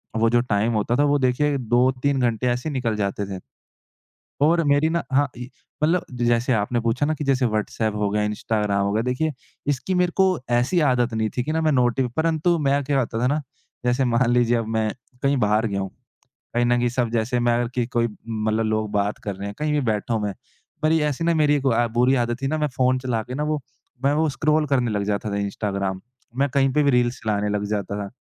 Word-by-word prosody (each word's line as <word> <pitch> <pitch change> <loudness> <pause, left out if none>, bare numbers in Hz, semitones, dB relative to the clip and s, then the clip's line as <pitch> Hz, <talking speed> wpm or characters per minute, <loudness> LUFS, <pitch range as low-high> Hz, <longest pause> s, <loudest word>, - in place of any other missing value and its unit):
वो 115 0 +3
जो 120 +1 +3
टाइम 110 -1 0
होता 110 +2 0
था 145 - +4
वो - - +4
देखिए 140 +3 +1
2-3 130 +3 +1
घंटे 120 -1 0
ऐसे 125 +4 -1
ही - - -5
निकल 120 -5 -1
जाते 100 0 -2
थे। - - -9 1.1
और 165 +2 +3
मेरी 145 +1 +3
ना 170 +1 -1
हाँ 145 +2 +4
इ 125 - -6 0.4
मतलब 170 +3 +2 0.2
जैसे 120 +2 +2
आपने 110 +2 0
पूछा 115 +5 0
ना 155 - +1
कि 150 - -5
जैसे 135 -2 +2
व्हाट्सएप 110 -1 -1
हो 105 -1 0
गया, 105 +1 0
इंस्टाग्राम 105 -1 -1
हो 100 - 0
गया, 110 - +1
देखिए 130 +6 0 0.4
इसकी 145 +6 -1
मेरे 180 -1 +2
को 190 - +4 0.3
ऐसी 125 +9 +2
आदत 125 -2 +1
नहीं 110 -1 0
थी 125 - +1
कि 155 - -3
ना 160 +1 0
मैं 155 -1 +2
नोटिव 125 -1 +2
परंतु 165 +2 +2
मैं 140 -1 +1
क्या 140 +1 0
करता 115 -2 -2
था 125 - +2
ना? 150 +3 0 0.4
जैसे 125 +2 +2
मान 120 0 +2
लीजिए 120 -1 +3
अब 115 -1 -3
मैं 110 -1 0 0.3
कहीं 140 0 +2
बाहर 105 0 +2
गया 100 -2 -2
हूँ, 95 - -4 0.7
कहीं 120 0 +2
न 120 0 +3
कहीं 120 0 +2
सब 120 -1 -1
जैसे 120 +2 0
मैं 120 0 +2
अगर 120 -1 -1
कि 120 -2 0
कोई 120 -1 0 0.2
मतलब 110 0 0
लोग 110 -1 -1
बात 100 0 0
कर 100 - -3
रहे 100 +1 -6
हैं 100 - -7
कहीं 150 0 -1
भी 150 - +2
बैठा 110 -1 -1
हूँ 110 - -1
मैं, 100 -1 -2 0.5
पर 155 +1 +3
ये 160 -2 +2
ऐसी 150 +3 -3
ना 170 - +3
मेरी 150 -2 +3
एक 140 - -2
गुआ 120 -3 +2
बुरी 125 +2 +4
आदत 120 +2 -4
थी - - 0
ना 155 +2 -1
मैं 150 -1 0
फ़ोन 130 0 +2
चला 125 -3 -2
के 125 +3 -8
ना 145 - -2
वो 150 0 -1 0.4
मैं 140 - +4
वो 160 +1 +2
स्क्रॉल 150 +2 +1
करने 130 -4 +1
लग 105 -1 -1
जाता 105 +1 -2
था 100 - -2
इंस्टाग्राम, 100 -1 -2 0.4
मैं 140 +2 +2
कहीं 135 -1 +3
पे 150 - +3
भी 145 - +3
रील्स 125 -1 +1
चलाने 105 -1 0
लग 105 0 -1
जाता 100 -1 -2
था। 100 - -5
125 Hz, 240 wpm, -23 LUFS, 110-140 Hz, 1.1 s, था